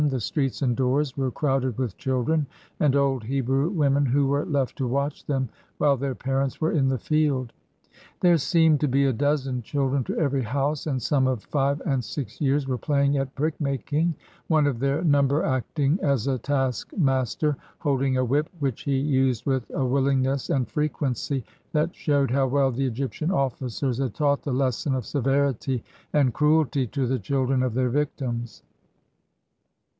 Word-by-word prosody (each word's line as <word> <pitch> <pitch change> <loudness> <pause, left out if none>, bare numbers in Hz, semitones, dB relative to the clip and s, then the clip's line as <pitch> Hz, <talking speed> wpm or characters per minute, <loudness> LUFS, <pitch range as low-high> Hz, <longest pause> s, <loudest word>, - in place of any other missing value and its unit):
The 130 -2 -1
streets 135 +4 -1
and 125 -3 +2
doors 135 +2 +1
were 135 -2 0
crowded 135 -4 -1
with 125 -7 -2
children, 135 +4 0 0.3
and 145 -2 +3
old 135 -4 +1
Hebrew 135 +4 0
women 145 -6 +2
who 140 +3 +2
were 140 +2 +1
left 140 -4 -1
to 130 - 0
watch 140 +4 -2
them 135 -3 0 0.3
while 145 -2 +3
their 135 0 -3
parents 135 +1 -1
were 160 - +1
in 135 -4 +2
the 130 - 0
field. 140 -2 0 0.7
There 175 -2 +4
seemed 160 0 +3
to 150 - +1
be 140 +1 +2
a 135 - +2
dozen 135 0 0
children 135 +2 0
to - - -3
every 140 -4 +1
house, 140 +6 -1
and 135 -4 0
some 130 +2 +1
of 125 -5 -1
five 140 0 0
and 135 -3 0
six 120 0 -6
years 140 -1 +1
were 130 -2 -1
playing 140 -1 +1
at 135 0 -3
brick 155 +3 -2
making, 145 +4 0 0.3
one 155 -3 +3
of 135 -5 0
their 140 +5 0
number 145 -1 +3
acting 140 - 0
as 140 -6 +1
a 135 -2 0
taskmaster, 135 - 0 0.2
holding 135 -3 0
a 130 - +2
whip 145 +5 +1
which 135 -7 -2
he 140 -1 0
used 130 -4 +1
with 130 -3 -1
a 135 - -1
willingness 135 0 +1
and 130 -3 +1
frequency 140 -3 -2 0.3
that 155 +2 0
showed 140 -4 +1
how 135 0 +2
well 135 0 +2
the 135 +2 -1
Egyptian 135 +6 -3
ofl&cers 135 - -1
had 130 - -2
taught 145 -2 +1
the 145 - -4
lesson 130 +1 0
of 125 -4 -3
severity 135 -2 0 0.3
and 140 -5 +3
cruelty 150 -3 +2
to 135 +3 -2
the 130 +1 0
children 135 -2 0
of 125 -3 -1
their 130 -1 +1
victims. 125 -4 -3
135 Hz, 175 wpm, -25 LUFS, 130-145 Hz, 0.7 s, There